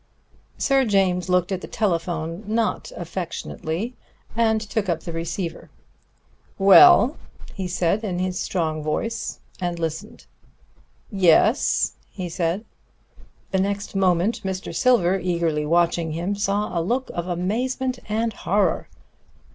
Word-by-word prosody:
Sir 270 -1 +3
James 190 -5 +1
looked 180 +1 +2
at 185 -1 -2
the - - -7
telephone, 170 -3 -2
not 225 +1 -1
affectionately, 175 +3 -4 0.4
and 220 -1 +3
took 210 -2 -3
up 165 -2 0
the 170 - -6
receiver. 165 +1 -4 0.9
"Well?" 270 - +7 0.4
he 190 -3 -4
said 180 +4 0
in 185 -4 -2
his 185 0 -2
strong 160 -4 -1
voice; 155 +10 -3 0.2
and 175 -2 -2
listened. 165 -2 -5 0.9
"Yes," 195 - +3 0.2
he 185 -3 -6
said. 170 +5 -1 0.9
The 190 - +1
next 200 +1 -2
moment 190 +2 +2
Mr. 190 -1 -4
Silver, 195 -7 +3
eagerly 170 -4 0
watching 170 -1 +2
him, 175 +5 -2
saw 205 0 -1
a 170 - +1
look 245 +10 -1
of 175 0 -3
amazement 245 +8 -1
and 225 +1 0
horror. 195 -2 0
185 Hz, 125 wpm, -23 LUFS, 170-215 Hz, 0.9 s, Well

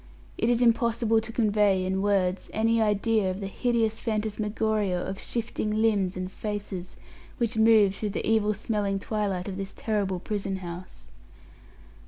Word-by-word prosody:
It 230 - 0
is 245 0 +3
impossible 230 -1 +3
to 225 - -6
convey, 210 -4 +2
in 190 +1 0
words, 195 -2 +1
any 225 +1 +2
idea 210 -1 +2
of 185 +1 -3
the 200 - -4
hideous 225 +1 0
phantasmagoria 215 -2 -1
of 190 +2 -4
shifting 215 -2 -2
limbs 200 -5 +2
and 185 0 -4
faces 205 -3 -5 0.4
which 235 -3 -1
moved 220 -3 +5
through 210 - -2
the 200 - -3
evil 215 -1 +2
smelling 205 -2 -1
twilight 195 -3 -2
of 190 -1 -5
this 195 0 -6
terrible 200 -4 -1
prison 195 0 -3
house. 180 -1 -8
210 Hz, 150 wpm, -27 LUFS, 195-220 Hz, 0.4 s, moved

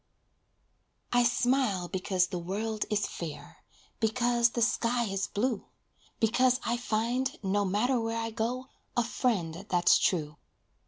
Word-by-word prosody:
I 245 0 +5
smile 240 -6 +1
because 185 0 +1
the 180 -1 -4
world 210 +5 -2
is 210 -1 +1
fair; 160 -4 -8 0.4
Because 235 +1 +2
the 235 - -3
sky 240 +1 +1
is 195 -3 -2
blue. 225 0 -1 0.5
Because 250 +3 +3
I 235 - +1
find, 240 +2 -1
no 200 +1 +1
matter 225 +7 +1
where 225 0 -2
I 225 0 -3
go, 240 +4 -2 0.3
a 240 - +4
friend 195 -8 -1
that's 175 -1 +4
true. 150 -5 0
225 Hz, 130 wpm, -29 LUFS, 190-245 Hz, 0.5 s, I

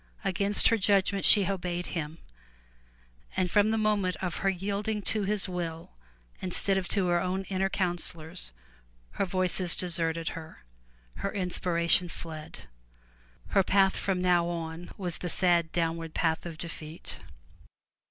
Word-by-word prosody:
Against 200 +2 +2
her 230 - +2
judgment 195 0 +2
she 205 -3 +8
obeyed 180 -2 -2
him, 160 -1 -4 1.2
and 180 -2 +1
from 205 +1 +4
the 225 - +1
moment 210 -4 +1
of 180 -2 -4
her 195 - +1
yielding 200 +3 -2
to 210 0 +1
his 210 0 +2
will, 170 -3 -5 0.5
instead 190 +2 +1
of 190 -2 -1
to 195 -3 +1
her 175 0 +2
own 185 +1 -1
inner 190 0 0
counsellors, 175 - -3 0.6
her 200 - -1
Voices 185 -1 +4
deserted 165 -2 -1
her; 160 - -10 0.5
her 200 - -2
inspiration 180 -2 +2
fled. 160 -2 -8 0.9
Her 195 - +4
path 195 0 +3
from 185 -2 -1
now 175 -1 +3
on 170 0 -5
was 180 -4 -4
the 180 - -4
sad 170 -3 +2
downward 165 -1 -2
path 160 0 0
of 165 -2 -8
defeat. 160 -1 -6
180 Hz, 140 wpm, -29 LUFS, 170-195 Hz, 1.2 s, she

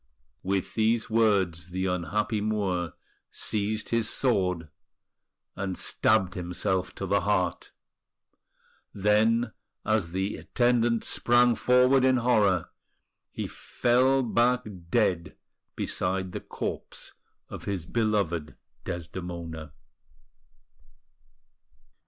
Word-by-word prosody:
With 95 0 -1
these 110 0 +1
words 95 -7 +2
the 95 +1 -3
unhappy 100 +5 -1
Moor 95 -6 -1 0.4
seized 105 +1 -1
his 115 -2 +1
sword, 90 -10 +1 0.9
and 95 -2 -3
stabbed 100 -4 +2
himself 90 0 -2
to 95 - -4
the 100 +2 +2
heart; 95 -4 0 1.2
then, 110 +4 +2 0.3
as 110 -6 +1
the 95 +3 -2
attendants 120 -1 +1
sprang 120 0 +4
forward 125 +2 +4
in 130 0 +4
horror, 105 -8 +2 0.6
he - - -4
fell 130 +2 +2
back 120 +1 +2 0.3
dead 90 -7 +1 0.4
beside 95 0 -2
the - - -5
corpse - - -6 0.3
of - - -9
his 95 -5 -3
beloved 100 -8 -1 0.3
Desdemona. 85 -2 -6
100 Hz, 90 wpm, -27 LUFS, 90-115 Hz, 1.2 s, sprang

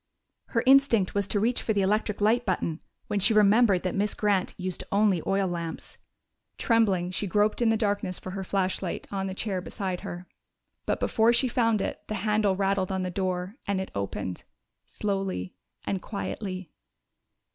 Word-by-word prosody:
Her 230 -1 -1
instinct 260 -7 +5
was 200 -1 0
to 205 - 0
reach 235 +4 +1
for 220 - 0
the 200 -2 +2
electric 210 +1 0
light 225 +4 +3
button 170 -5 -2 0.2
when 205 - -1
she 215 +3 +4
remembered 210 -2 +5
that 185 - -1
Miss 205 +1 0
Grant 200 -3 +1
used 185 -1 -4
only 200 -4 +3
oil 195 0 +2
lamps. 170 -2 -5 0.6
Trembling, 195 -7 +2
she 200 +2 -2
groped 210 +5 +1
in 235 - +4
the 225 - +3
darkness 205 -4 0
for 185 - -7
her 190 0 -4
flashlight, 190 -1 -2
on 195 -1 -2
the 190 - -5
chair 195 -3 -2
beside 185 -1 -4
her. 175 +1 -7 0.6
But - - 0
before 225 +1 +3
she 250 +2 +2
found 230 -4 +1
it - - -4
the 215 - -3
handle 210 -2 +2
rattled 195 -1 0
on 190 -1 -1
the 180 - -3
door, 185 +3 -2
and 200 -1 0
it 190 - -5
opened 100 -2 -4 0.4
slowly 195 - -3 0.3
and 195 -2 -2
quietly. 190 -4 -5
195 Hz, 175 wpm, -27 LUFS, 185-215 Hz, 0.6 s, instinct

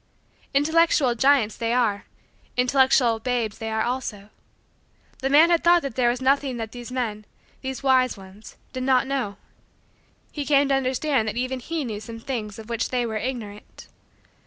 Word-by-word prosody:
Intellectual 305 -3 +3
giants 255 -3 +3
they 230 0 -1
are; 220 -5 +1 0.5
intellectual 250 -2 +3
babes 235 -3 -2
they 225 - -4
are, 220 0 0
also. 240 -5 -4 0.9
The 270 - -1
man 310 +5 +6
had 340 - +3
thought 345 0 +5
that 275 - -4
there 245 -2 +3
was 240 +1 -1
nothing 270 -1 +1
that 225 -2 -5
these 245 0 -9
men 225 -5 -3 0.4
these 265 0 -5
wise 255 -3 +3
ones 195 +2 -13 0.2
did 255 - -4
not 260 0 +3
know. 260 -7 -3 0.9
He 295 - -4
came 280 -1 +3
to - - +3
understand 265 -2 0
that 215 +2 -3
even 255 +1 -2
he 315 +3 -4
knew 215 -3 -4
some 225 +1 -9
things 225 -5 -5
of 220 -1 -10
which 235 0 -2
they 250 -1 0
were 220 -2 -3
ignorant. 215 -4 -7
250 Hz, 170 wpm, -24 LUFS, 225-270 Hz, 0.9 s, man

